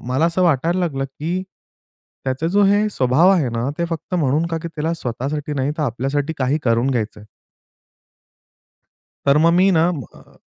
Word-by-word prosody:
मला 130 +6 +1
असं 170 +2 0
वाटायला 170 +2 +2
लागलं 140 -6 -1
की, 160 +7 -4 0.8
त्याचा 130 +5 -1
जो 200 +4 +3
हे 205 +2 +3
स्वभाव 135 +4 +3
आहे 165 -9 +2
ना 115 +3 -2
ते 170 - +1
फक्त 165 +2 -4
म्हणून 155 0 +1
का 165 -1 -2
की 170 - -4
त्याला 160 +1 -3
स्वतःसाठी 145 +2 -4
नाही 135 0 0
तर - - 0
आपल्यासाठी 140 +4 -1
काही 135 +3 +1
करून 120 +2 +2
घ्यायचं 110 -4 -2
आहे. 105 - -15 2.0
तर 140 +1 +5
मग 165 +2 +4
मी 185 +3 +4
ना, 165 -2 +3 0.3
अ - - -20
150 Hz, 170 wpm, -20 LUFS, 130-170 Hz, 2.0 s, तर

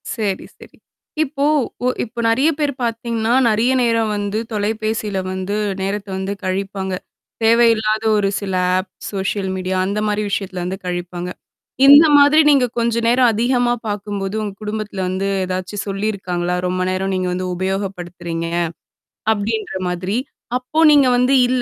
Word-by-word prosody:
சரி, 205 -4 -2
சரி. - - -16 0.5
இப்போ 280 -1 -2 0.4
ஒ - - +3 0.2
இப்போ 240 0 -8
நெறைய 265 +7 +3
பேர் 295 -2 0
பாத்தீங்கன்னா, 230 -1 -1 0.2
நறைய 225 +4 +2
நேரம் 230 -2 +1
வந்து 205 +1 -2
தொலைபேசில 215 -1 -1
வந்து 190 +2 -3 0.3
நேரத்த 200 +1 -3
வந்து 190 +1 -3
கழிப்பாங்க. 190 0 -2 0.5
தேவையில்லாத 225 -1 +3
ஒரு 200 -1 +1
சில 195 -2 -4 0.2
ஆப் 185 +1 -3 0.2
சோஷியல் 195 0 -2
மீடியா 185 0 -2
அந்த 200 +2 -1
மாரி 210 0 0
விஷயத்துல 190 -2 -3
வந்து 185 +2 -3
கழிப்பாங்க. 175 0 -4 0.6
இந்த 285 +3 +10
மாதிரி 290 +2 +6
நீங்க 275 -4 +5
கொஞ்ச 235 0 +1
நேரம் 245 +1 +4
அதிகமா 240 +2 +2
பாக்கும்போது, 205 -1 -3
உங்க 205 -2 -4
குடும்பத்தில 210 -2 -4
வந்து 190 +2 -2 0.2
ஏதாச்சும் 185 +2 -3
சொல்லியிருக்காங்களா? 195 -3 -2
ரொம்ப 185 0 -1
நேரம் 190 +1 -1
நீங்க 185 0 -1
வந்து 185 0 -3
உபயோகப்படுத்துறீங்க, 180 -3 -3 0.9
அப்டின்ற 215 0 -3
மாதிரி. 185 +4 -2 0.4
அப்போ 255 +5 -3
நீங்க 285 -3 +6
வந்து 250 +2 +3
இல்ல 255 0 +1
205 Hz, 140 wpm, -19 LUFS, 190-230 Hz, 0.9 s, இந்த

